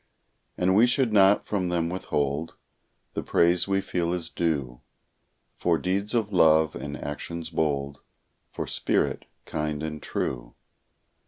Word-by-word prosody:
And 90 +1 +2
we 115 +4 +6
should 125 -2 +2
not 100 0 +5
from 95 -4 -1
them 85 -2 0
withhold 75 -4 -2 0.6
The - - -2
praise 85 +2 +2
we 95 0 +1
feel 85 -2 -1
is 85 -2 -4
due 70 -8 -2 0.8
For 85 -2 +2
deeds 100 +6 -1
of 105 -3 0
love, 80 -3 +4
and 75 0 -5
actions 80 +3 -6
bold, 70 -3 -1 0.5
For - - -4
spirit - - -1 0.2
kind 75 0 -3
and 75 -1 -5
true. - - -4
85 Hz, 135 wpm, -26 LUFS, 75-95 Hz, 0.8 s, we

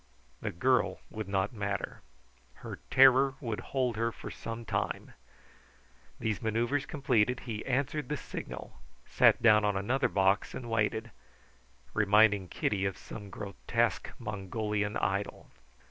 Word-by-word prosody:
The - - -2
girl 100 0 +1
would 110 -2 -5
not 100 +3 0
matter. 100 -2 -3 0.6
Her - - -6
terror 135 +1 +6
would 115 -6 -3
hold 125 -4 -1
her 115 +1 +1
for - - -8
some 115 0 -6
time. - - -2 1.1
These 110 -4 -1
manoeuvres 120 +6 0
completed, 125 -6 +1
he 110 -3 -5
answered 135 +1 -1
the 150 - -1
signal, - - -8 0.3
sat - - +4
down 105 -1 +6
on 105 -1 +1
another 125 +8 +1
box 95 0 +2
and 120 -2 -6
waited, 110 +1 0 0.8
reminding 105 -2 +4
Kitty 95 +2 -1
of 95 - -2
some 105 -2 -9
grotesque 110 +4 -1
Mongolian 105 -1 -2
idol. - - -2
110 Hz, 130 wpm, -31 LUFS, 105-125 Hz, 1.1 s, terror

